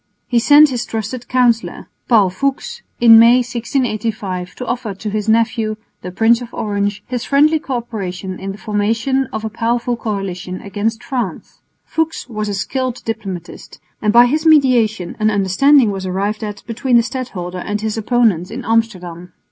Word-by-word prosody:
He 240 - +2
sent 295 +5 +6
his 245 -2 -2
trusted 225 +3 -5
councillor, 245 -2 +1 0.2
Paul 210 -6 +4
Fuchs, 275 +8 -3 0.2
in 225 -1 +8
May, 240 +2 +6
1685, 225 -6 -3
to 250 - -6
offer 235 -5 -3
to 210 +3 -5
his 215 +1 -2
nephew, 225 -1 +1 0.3
the 180 - -6
Prince 225 +6 +3
of 240 - -8
Orange, 205 -1 -2
his 245 -1 -4
friendly 300 +3 +3
co 275 -4 -4
operation 190 -6 -5
in 195 +1 -5
the 195 - -9
formation 225 +6 0
of 220 - -4
a - - -2
powerful 235 +2 -1
coalition 195 -5 -4
against 215 +3 -3
France. 235 - -5 0.2
Fuchs 320 -4 -2
was 215 -3 -4
a 200 - -2
skilled 255 +5 -3
diplomatist, 195 -6 -6 0.2
and 210 - +2
by 240 +2 +7
his 305 +5 0
mediation 245 - +3
an 215 0 +3
understanding 215 +5 +3
was 190 -1 -5
arrived 200 +4 -2
at 205 -1 -6
between 240 +2 +1
the 235 - +4
stadholder 200 -8 -5
and 210 +3 -3
his 220 -1 -2
opponents 220 -6 +1
in 245 +3 -7
Amsterdam. 180 -6 -2
225 Hz, 165 wpm, -17 LUFS, 200-245 Hz, 0.3 s, in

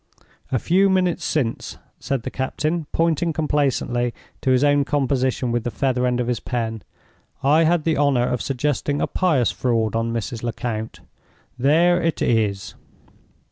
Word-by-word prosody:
"A 130 - +2
few 190 - +3
minutes 185 -2 +1
since," 130 -7 -2 0.2
said 135 -4 -2
the - - -5
captain, 155 +4 -2
pointing 165 0 +1
complacently 135 -5 0 0.3
to - - 0
his 130 +1 +3
own 145 0 +4
composition 130 -3 0
with 120 -1 -1
the - - -2
feather 125 0 0
end 125 0 0
of 125 - 0
his 120 -2 -1
pen, 115 -3 -3 0.6
"I 155 +4 +4
had 170 0 +2
the 160 0 +1
honor 140 -4 +2
of 125 - -1
suggesting 145 +2 -1
a - - +1
pious 155 - +1
fraud 115 -3 0
on 115 0 0
Mrs. 115 0 -4
Lecount. 115 -2 -4 0.6
There 170 +7 +4
it 165 -1 -1
is!" 105 -5 0
130 Hz, 155 wpm, -22 LUFS, 120-155 Hz, 0.6 s, own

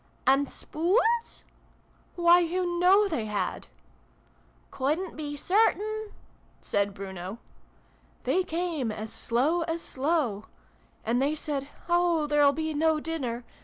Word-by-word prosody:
" - - -35
And 275 +1 +4
spoons? 450 +8 0
" - - -34
'' - - -35
Why, 345 0 +6
you 350 0 -1
know 390 +4 +5
they 240 - -2
had 200 -4 -3 0.3
!" - - -35
" - - -35
Couldn't 310 +7 -1
be 290 -1 -5
certain" 430 +5 +1 0.5
said 200 0 -1
Bruno.) 190 +1 -6 0.4
" - - -34
they 375 - +2
came 330 -8 -2
as 215 +1 -6
slow 275 +9 +1
as 325 0 -2
slow! 260 -7 -1 0.6
And 235 +3 +1
they 290 +3 +1
said 285 -2 -3
' - - -24
Oh! 345 -3 +2
There'll 295 -1 +4
be 315 +2 -2
no 315 +1 +2
dinner 265 -7 -3
310 Hz, 145 wpm, -28 LUFS, 260-350 Hz, 0.6 s, Why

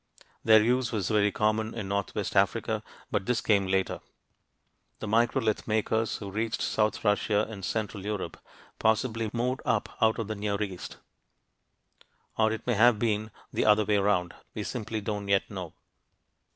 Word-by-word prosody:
Their 110 -1 +7
use 125 0 +1
was 100 -5 -1
very 105 -1 +3
common 110 +1 0
in 105 -4 -4
northwest 100 0 -2
Africa - - +2 0.3
but 95 - -1
this 125 -1 +2
came 100 -3 +2
later. 95 0 0 1.0
The - - -6
microlith 115 +1 +1
makers 110 +1 0
who 100 -2 -7
reached 110 +3 -2
south 105 0 0
Russia 105 0 +2
and 105 -3 -8
central 105 -1 -3
Europe 105 -1 -4 0.4
possibly 110 0 +1
moved 125 +2 -1
up - - 0
out 110 0 +4
of 115 - -3
the 110 - -2
Near 100 -1 -2
East. 95 -3 -7 1.4
Or 110 0 +3
it 110 - -4
may 120 - +1
have 115 +1 +5
been 110 -1 0 0.2
the - - +1
other 105 0 +5
way 105 0 +2
around; 100 -3 +1 0.2
we - - -3
simply 110 0 -4
don't 105 -1 -3
yet 100 +1 +1
know. 90 -5 -6
110 Hz, 160 wpm, -28 LUFS, 100-110 Hz, 1.4 s, Their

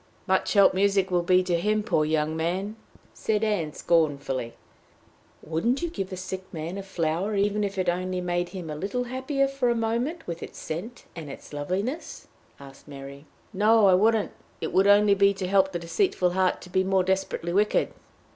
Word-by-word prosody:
"Much 190 -1 +1
help 200 -2 +6
music 195 0 +2
will 175 -1 +2
be 185 +1 +3
to 175 -2 0
him, 210 +3 +1
poor 155 - +1
young 155 0 0
man!" 185 +6 -2 0.4
said 215 -1 -1
Ann, 200 -8 0
scornfully. 140 -8 0 0.9
"Wouldn't 235 - -1
you 340 - -2
give 195 - -4
a 185 - -5
sick 185 +1 -6
man 165 +4 -5
a - - -4
flower, 185 +2 -2
even 205 +1 +1
if 200 -1 -3
it 185 - -1
only 185 +1 -1
made 175 0 -1
him 175 -5 -7
a - - -4
little 200 +10 -2
happier 260 +3 -1
for 270 -2 0
a 235 - +2
moment 235 +9 -2
with 170 -1 -6
its - - -9
scent 210 +10 -6
and 160 -4 -7
its 140 - -11
loveliness?" 190 - -4 0.3
asked 135 0 -14
Mary. 140 0 -10 0.3
"No, 215 +2 +4
I 190 - +6
wouldn't. 215 +3 +3 0.3
It - - -4
would 195 +1 +4
only 205 0 +6
be 200 0 +3
to 190 -1 -3
help 190 0 +3
the 175 - -2
deceitful 180 - 0
heart 185 0 +1
to 180 - -13
be 185 +1 +2
more 190 0 +2
desperately 190 -2 -1
wicked." 210 +2 +2
190 Hz, 190 wpm, -26 LUFS, 170-210 Hz, 0.9 s, help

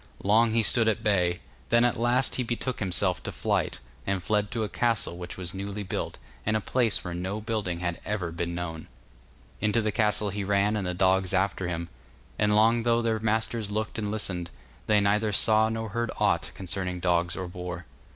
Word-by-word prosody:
Long 110 +3 +4
he 115 0 +3
stood 115 +1 +4
at 110 - +1
bay; 90 -4 +2 0.3
then 120 +1 +5
at 120 - +1
last 120 +3 +2
he - - 0
betook 120 +2 -3
himself 95 -1 +1
to - - -5
flight, - - 0 0.3
and 95 -2 -1
fled 105 0 +1
to 115 -1 -2
a - - -1
castle 115 -4 0
which 90 0 -7
was 90 -1 -2
newly 100 +1 -4
built, 95 - -4 0.3
in 110 - +1
a - - +3
place 115 0 +1
where 90 -2 -4
no 95 +4 -3
building 105 -6 -2
had 85 -1 -2
ever 100 -5 -2
been 85 +1 -3
known. 80 -2 -5 0.7
Into 105 +2 +2
the 110 -1 0
castle 105 -1 +1
he 100 +1 -3
ran, 100 +2 +2
and 100 -3 -1
the 90 - -2
dogs 95 0 +2
after 95 -1 0
him, 85 -1 -3 0.5
and 105 0 +3
long 115 +2 +5
though 115 0 +2
their 110 -1 +1
masters 110 0 0
looked 110 +1 -2
and 105 -1 -2
listened, 95 -5 -2 0.4
they 105 -1 +4
neither 105 +2 +2
saw 110 +2 +4
nor 110 0 -3
heard 120 +2 -2
aught - - +2
concerning 90 -1 -3
dogs 85 -1 +1
or 95 -1 -4
boar. 90 -1 -6
105 Hz, 200 wpm, -27 LUFS, 90-110 Hz, 0.7 s, then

